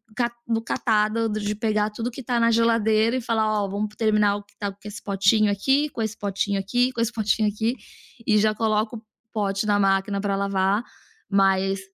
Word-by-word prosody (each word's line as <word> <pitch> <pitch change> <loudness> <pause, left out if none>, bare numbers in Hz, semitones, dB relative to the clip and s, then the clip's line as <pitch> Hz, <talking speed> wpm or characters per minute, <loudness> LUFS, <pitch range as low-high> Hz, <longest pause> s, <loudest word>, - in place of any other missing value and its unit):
ca 240 0 0 0.2
do 225 -1 0
catado, 225 -1 0
do 215 0 -2
de 210 0 -2
pegar 215 -1 0
tudo 225 +3 -5
o - - -3
que 265 - -8
tá 240 -1 0
na 230 0 +3
geladeira, 230 0 +3
e - - -3
falar: 225 -1 0 0.2
"Ó, 200 - -2
vamos 210 +2 -3
terminar 210 -2 +2
o 205 - -6
que 205 - -29
estava 200 -2 -5
com 210 - -11
esse 205 - -8
potinho 205 +1 +2
aqui, 270 +9 +1
com 230 - -6
esse 220 -1 -3
potinho 200 -1 -1
aqui, 245 +6 +1
com 230 -2 -3
esse 230 +1 0
potinho 215 -1 +1
aqui." 220 +4 -1 0.5
E 215 -1 +4
já 215 +1 +3
coloca 215 +1 0
o 220 - -12 0.3
pote 200 -1 -1
na 205 -1 +2
máquina 195 0 +1
pra 200 -1 -1
lavar, 200 +2 +1 0.5
mas, 195 -1 +2
215 Hz, 210 wpm, -24 LUFS, 200-230 Hz, 0.5 s, E